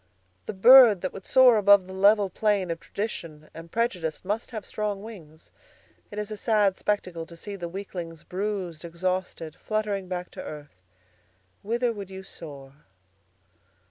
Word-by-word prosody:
'The - - -3
bird 230 -1 +8
that 185 - -3
would 195 - -10
soar 255 -3 +6
above 200 -2 +5
the 190 - -10
level 200 +2 +4
plain 195 -2 0
of 165 - -4
tradition 165 -7 -6
and 165 +1 -11
prejudice 185 -9 -2
must 210 +4 -2
have 215 -5 -7
strong 205 -2 -3
wings. 165 -8 -12 0.6
It 205 - -10
is 210 0 -4
a 215 - -5
sad 210 -3 +2
spectacle 180 -6 -2
to 170 - -13
see 200 +4 -7
the 175 -3 -6
weaklings 175 -4 -7
bruised, 185 -4 -4
exhausted, 170 -2 -3
fluttering 210 -3 -2
back 180 -1 -5
to - - -8
earth.'" 145 -11 -10 0.8
"Whither 235 +2 0
would 200 -3 -8
you 190 0 -9
soar?" 140 -7 -11
190 Hz, 155 wpm, -26 LUFS, 170-210 Hz, 0.8 s, bird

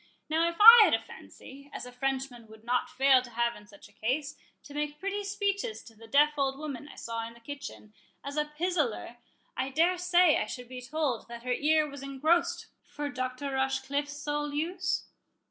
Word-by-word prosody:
"Now, 325 +2 +2
if 340 - -7
I 460 +2 +12
had - - +4
a - - -1
fancy, 280 +1 -13
as - - -7
a 250 - -10
Frenchman 260 -2 -3
would 220 0 -15
not 245 +1 0
fail 265 0 +4
to 250 - -11
have 235 0 0
in 210 - -14
such 200 - -15
a - - -23
case, 280 +8 -2 0.3
to 285 - -12
make 295 0 -3
pretty 395 +2 -3
speeches 405 +2 -2
to 230 - -15
the 225 +1 -14
deaf 295 +4 +3
old 270 -1 0
woman 290 -2 -6
I - - -12
saw 230 0 -5
in 230 - -13
the - - -16
kitchen, 280 -4 -9 0.3
as 280 +1 -6
a 300 0 +1
pisaller, 300 -7 -2 0.4
I 260 - -2
dare 335 +6 +2
say 360 -2 +4
I - - -2
should 250 -1 -8
be 255 -1 -7
told 270 -3 -2
that 235 0 -9
her 250 0 0
ear 305 +3 +2
was 280 -1 -9
engrossed 280 +5 0 0.2
for 290 0 -5
Dr. 255 +2 -4
Rochecliffe's 275 +2 -2
sole 295 0 -2
use?" 340 +3 -1
280 Hz, 200 wpm, -29 LUFS, 250-310 Hz, 0.4 s, I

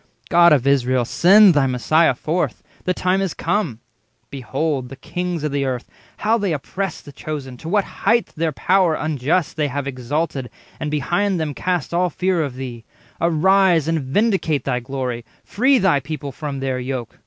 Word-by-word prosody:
God 170 -1 +6
of 140 -4 +3
Israel, 130 -3 +2
Send 195 - +6
thy 145 -3 +3
Messiah 130 +4 +2
forth; 160 +7 -2 0.2
the 185 - +1
time 185 +1 +1
is 190 -4 -2
come. 165 - -1 0.5
Behold 135 0 -2
the 135 - -8
kings 175 +1 -4
of 150 - -1
the 140 0 0
earth, 130 -2 -3 0.3
how 225 +2 +1
they 200 -5 0
oppress 180 +5 -4
Thy 145 - -12
Chosen, 140 -3 -6
to 160 - -8
what 205 +2 +2
highth 235 +1 0
their 160 0 -1
power 180 +3 +2
unjust 155 +3 -1
They 150 -1 +1
have 140 0 -3
exalted, 135 +1 -3 0.3
and 150 - -3
behind 175 +6 0
them 155 -2 -2
cast 175 0 -2
All 180 +1 +2
fear 180 +1 0
of 140 -5 -3
Thee; 125 -3 -7 0.4
arise, 170 0 +3
and 165 0 +1
vindicate 165 - 0
Thy 125 -2 -1
glory; 125 -1 -4 0.2
free 260 +6 +2
thy 190 - +3
people 140 0 -6
from 140 0 -5
their 130 -1 -1
yoke! 125 -2 -5
155 Hz, 175 wpm, -20 LUFS, 135-180 Hz, 0.5 s, God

